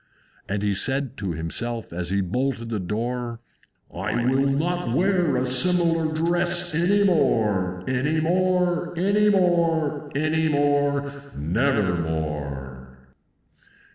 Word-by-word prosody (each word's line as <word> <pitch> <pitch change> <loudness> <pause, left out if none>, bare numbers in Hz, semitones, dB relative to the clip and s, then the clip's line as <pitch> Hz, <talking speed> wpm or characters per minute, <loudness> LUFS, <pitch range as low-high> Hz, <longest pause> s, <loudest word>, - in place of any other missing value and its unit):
And 100 +1 -2
he 100 -1 +1
said 135 +5 -1
to 95 -4 -3
himself, 110 +8 -5
as 85 0 -4
he 100 +1 +1
bolted 120 +4 -2
the 110 -2 -2
door, 115 +5 -3 0.5
"I 120 - -2
will 135 +2 +2
not 165 +2 -1
wear 180 -5 +2
a 125 - 0
similar 165 +3 +2
dress 175 +2 0
any 185 +6 +3
more, 105 - +1
Any 140 +5 0
more, 180 0 +1
any 200 +4 +3
more, 165 -6 +1
any 155 +2 +1
more, 145 -1 +1 0.2
never 105 - +1
more!" 70 -5 -4
140 Hz, 115 wpm, -24 LUFS, 100-170 Hz, 0.5 s, any